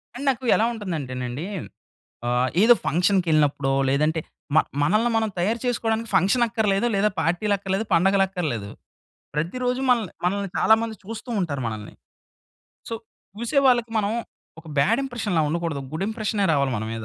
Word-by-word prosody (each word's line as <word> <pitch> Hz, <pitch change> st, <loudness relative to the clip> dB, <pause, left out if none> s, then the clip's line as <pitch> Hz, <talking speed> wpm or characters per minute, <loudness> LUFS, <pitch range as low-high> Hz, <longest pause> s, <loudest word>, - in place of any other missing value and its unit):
And 265 Hz, -, -6 dB
నాకు 260 Hz, -1 st, -1 dB
ఎలా 220 Hz, -, +3 dB
ఉంటుందంటేనండి 140 Hz, -, -4 dB, 0.8 s
ఆహ్, 125 Hz, +1 st, +2 dB
ఏదో 240 Hz, +2 st, +8 dB
ఫంక్షన్‌‌కెళ్ళినప్పుడో 155 Hz, -6 st, +2 dB, 0.2 s
లేదంటే 155 Hz, +4 st, +1 dB, 0.3 s
మ -, -, +7 dB, 0.2 s
మనల్ని 215 Hz, +10 st, +2 dB
మనం 220 Hz, -1 st, +1 dB
తయారు 215 Hz, +7 st, 0 dB
చేసుకోవడానికి 230 Hz, -2 st, -1 dB
ఫంక్షన్ 195 Hz, +6 st, +4 dB
అక్కర్లేదు 220 Hz, -1 st, +1 dB
లేదా 200 Hz, +2 st, +3 dB
పార్టీలక్కర్లేదు, 195 Hz, +4 st, 0 dB
పండగలక్కర్లేదు. 180 Hz, -, +1 dB, 0.7 s
ప్రతిరోజూ 250 Hz, -, -1 dB
మనల్ని, 230 Hz, -7 st, +2 dB
మనల్ని 195 Hz, +1 st, 0 dB
చాలామంది 220 Hz, 0 st, +3 dB
చూస్తూ 225 Hz, +4 st, -8 dB
ఉంటారు 145 Hz, -6 st, -2 dB
మనల్ని. 110 Hz, -2 st, -6 dB, 1.0 s
సో, 230 Hz, -, -3 dB, 0.5 s
చూసే 235 Hz, +5 st, +1 dB
వాళ్ళకి 240 Hz, -2 st, +3 dB
మనం 205 Hz, -1 st, 0 dB, 0.5 s
ఒక 165 Hz, -, -19 dB
బాడ్ 220 Hz, -, +3 dB
ఇంప్రెషన్‌లా 220 Hz, -10 st, -1 dB
ఉండకూడదు. 165 Hz, -3 st, -2 dB
గుడ్ 190 Hz, +5 st, -2 dB
ఇంప్రెషనే 215 Hz, -2 st, -1 dB
రావాలి 140 Hz, -3 st, +1 dB
మన 105 Hz, -, -3 dB
మీద. 115 Hz, -1 st, -5 dB
195 Hz, 135 wpm, -24 LUFS, 155-225 Hz, 1.0 s, ఏదో